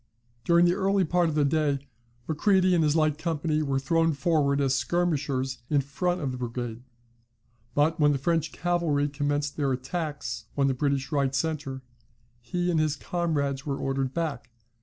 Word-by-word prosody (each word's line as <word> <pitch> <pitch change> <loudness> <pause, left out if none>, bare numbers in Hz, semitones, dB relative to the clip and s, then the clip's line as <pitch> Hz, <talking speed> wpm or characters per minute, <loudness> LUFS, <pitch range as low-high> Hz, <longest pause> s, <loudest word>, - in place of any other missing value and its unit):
During 170 +5 +5
the 175 - +4
earlier 195 0 +2
part 175 +1 +2
of 155 - -3
the 150 -1 +3
day 140 -2 0 0.4
Macready 185 +3 +3
and 170 -2 +3
his 150 0 +2
light 155 -2 +2
company 155 -2 -1
were 140 -3 0
thrown 165 +4 +2
forward 140 -1 +1
as 135 -2 +2
skirmishers 140 -3 0
in 145 -2 +3
front 175 +6 -2
of 135 -3 -1
the 125 - -6
brigade; 120 -1 -4 0.9
but 160 +3 +2
when 145 -1 +5
the 140 - +1
French 160 +3 0
cavalry 170 -5 0
commenced 145 0 -2
their 140 -3 +1
attacks 145 +4 -4
on 140 - +3
the 135 - +2
British 135 0 -1
right 140 -2 +1
centre, 135 -2 -2 0.6
he 175 +10 -2
and 165 - +2
his 155 -2 +1
comrades 145 -5 -1
were 140 -1 -1
ordered 135 -1 -1
back. 145 -7 -3
145 Hz, 170 wpm, -27 LUFS, 135-165 Hz, 0.9 s, During